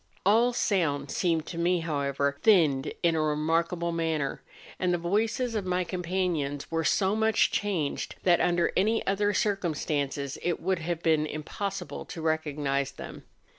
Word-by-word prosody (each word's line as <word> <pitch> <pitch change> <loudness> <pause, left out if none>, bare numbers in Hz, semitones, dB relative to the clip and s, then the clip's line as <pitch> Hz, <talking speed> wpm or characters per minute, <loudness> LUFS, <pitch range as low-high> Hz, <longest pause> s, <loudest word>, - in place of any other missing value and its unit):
All 230 +5 +4
sounds 155 - 0
seemed 165 -3 +1
to 170 - -6
me, 175 0 +2
however, 140 -3 -1
thinned 160 -11 +4
in 170 -1 +3
a 160 - +1
remarkable 165 +3 0
manner, 160 -4 -1 0.4
and 180 -1 +1
the 175 - +2
voices 220 +7 0
of 215 -3 -1
my 180 0 0
companions 175 -5 -2
were 165 0 0
so 190 +5 +2
much 220 0 +3
changed 180 -9 -2
that 175 -2 +4
under 175 -1 +2
any 220 +4 +2
other 205 +1 +1
circumstances 150 -9 -1
it 175 -1 -1
would 185 +1 0
have 170 0 -3
been 155 -2 +3
im¬ 155 0 -6
possible 200 -1 -4
to - - -8
recognise 150 -4 -1
them. - - -9
170 Hz, 155 wpm, -28 LUFS, 150-190 Hz, 0.4 s, All